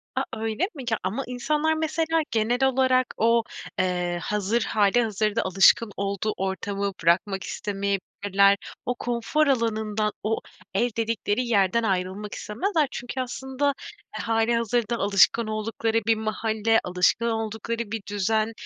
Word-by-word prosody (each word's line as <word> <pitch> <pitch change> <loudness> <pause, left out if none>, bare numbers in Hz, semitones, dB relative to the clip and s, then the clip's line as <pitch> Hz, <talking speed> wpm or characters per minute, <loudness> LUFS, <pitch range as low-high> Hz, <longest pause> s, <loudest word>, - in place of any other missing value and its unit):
A, - - +1
öyle 225 - -1
mi? 275 - -7
Ya, 225 - +2
ama 215 +9 -2
insanlar 300 +6 0
mesela 320 +1 0
genel 235 +4 +1
olarak 260 -1 +3
o, 230 +1 +3 0.4
eee, 180 -1 0
hazır, 210 +3 0
hâlihazırda 215 0 +1
alışkın 195 +3 +4
olduğu 200 +2 -1
ortamı 195 +1 -2
bırakmak 190 +3 +2
istemeyebilirler. 200 0 +1 0.3
O 245 - -1
konfor 245 +6 0
alanından, 220 -4 0
o 220 +2 0 0.3
ev 235 +6 +2
dedikleri 230 +1 0
yerden 215 0 +2
ayrılmak 195 0 -2
istemezler 305 - -1
çünkü 245 +2 -4
aslında, 265 +3 -2 0.4
eee, - - -4
hâlihazırda 230 +1 +1
alışkın 205 +3 +3
oldukları 220 +1 -1
bir 225 - +5
mahalle, 220 0 +1
alışkın 180 +5 +2
oldukları 225 +1 -3
bir 225 -1 -3
düzen, 215 +2 0
220 Hz, 125 wpm, -25 LUFS, 200-240 Hz, 0.4 s, bir